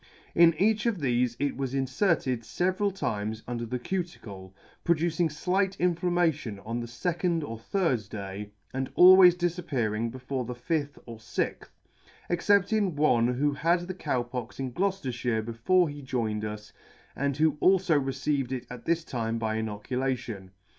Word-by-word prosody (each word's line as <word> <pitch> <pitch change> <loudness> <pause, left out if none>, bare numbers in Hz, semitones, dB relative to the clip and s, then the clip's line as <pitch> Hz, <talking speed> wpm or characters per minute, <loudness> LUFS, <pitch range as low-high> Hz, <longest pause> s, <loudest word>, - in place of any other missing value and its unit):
In 170 -1 +6
each 215 +4 +2
of 230 -4 +1
thefe 125 -4 +1
it 140 0 -1
was 135 -1 -3
inferted 135 - +1
feveral 185 - 0
times 110 - -3
under 120 -1 -3
the 125 - -2
cuticle, 120 - -5 0.3
producing 170 0 +1
flight 190 +5 0
inflammation 175 - +1
on 115 +2 -3
the 120 - -5
fecond 165 +6 -1
or 115 -5 -6
third 125 - -1
day, 100 0 -6 0.2
and 130 0 -2
always 180 -1 +9
difappear 165 - -1
ing 115 +2 -1
before 130 +2 -4
the 125 +1 -6
fifth 145 +3 -2
or 115 -2 -9
Sixth; 110 - -3 0.6
except 200 +3 +3
in 200 -6 +1
one 125 -6 +3
who 145 +3 +2
had 170 +5 +2
the 180 +2 -5
Cow 130 -8 -1
Pox 120 0 -7
in 130 -2 -3
Gloucefterfhire 125 - -1
before 140 +11 +2
he 145 -1 -7
joined 115 -5 -2
us, 105 0 -6 0.4
and 140 0 -1
who 155 -1 +2
alfo 180 -6 +4
received 135 -1 -1
it 130 -2 -3
at 125 -1 -9
this 170 0 +1
time 115 -5 -2
by 110 -1 -1
inoculation. 110 -1 -3
135 Hz, 155 wpm, -28 LUFS, 115-175 Hz, 0.6 s, always